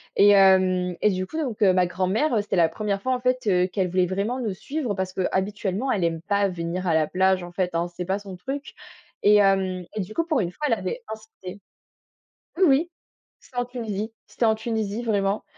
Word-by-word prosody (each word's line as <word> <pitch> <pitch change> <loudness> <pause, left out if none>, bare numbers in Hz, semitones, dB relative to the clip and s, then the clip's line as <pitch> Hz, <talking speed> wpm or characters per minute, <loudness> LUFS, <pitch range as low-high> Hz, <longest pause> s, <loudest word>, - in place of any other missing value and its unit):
Et 205 0 +6
heu 185 -2 +4
et 210 - +4
du 185 0 -2
coup, 315 - -7
donc 250 -9 -3
ma 185 -2 +4
grand-mère, 190 - 0
heu, 210 - +3
c'était 205 - -3
la 165 -2 +4
1re 200 +2 -3
fois, 260 0 +1
en 250 - -1
fait, 250 -1 0
heu, 180 -1 +3
qu'elle 190 -1 -1
voulait 185 0 +2
vraiment 200 +7 -2
nous 215 -6 -2
suivre 275 -4 -3
parce 190 -1 -3
qu'habituellement, 195 +5 -1
elle 190 -5 0
aime 165 -1 -1
pas 200 +2 +1
venir 175 +1 -4
à 160 - +2
la 155 -1 +3
plage, 185 +1 +1
en 175 - -8
fait, 180 -2 -2
hein. 170 +1 0
C'est 175 0 -6
pas 190 +2 0
son 195 -2 -9
truc 270 +10 -6 0.5
et 210 +1 +5
hem 190 -3 +2
et - - -2
du 200 +4 -7
coup, 330 - +1
pour 310 -6 +1
une 175 -3 -1
fois, 300 - -5
elle 235 - +2
avait 210 +6 -4
insisté. 205 -3 -11 1.0
Oui 380 - +5
oui, 305 +5 +3 0.5
c'était 250 - -18
en 245 - +1
Tunisie 225 -3 -5
c'était 235 - -3
en 220 - +4
Tunisie, 220 -1 -3
vraiment. 200 -2 0
195 Hz, 220 wpm, -24 LUFS, 185-225 Hz, 1.0 s, Et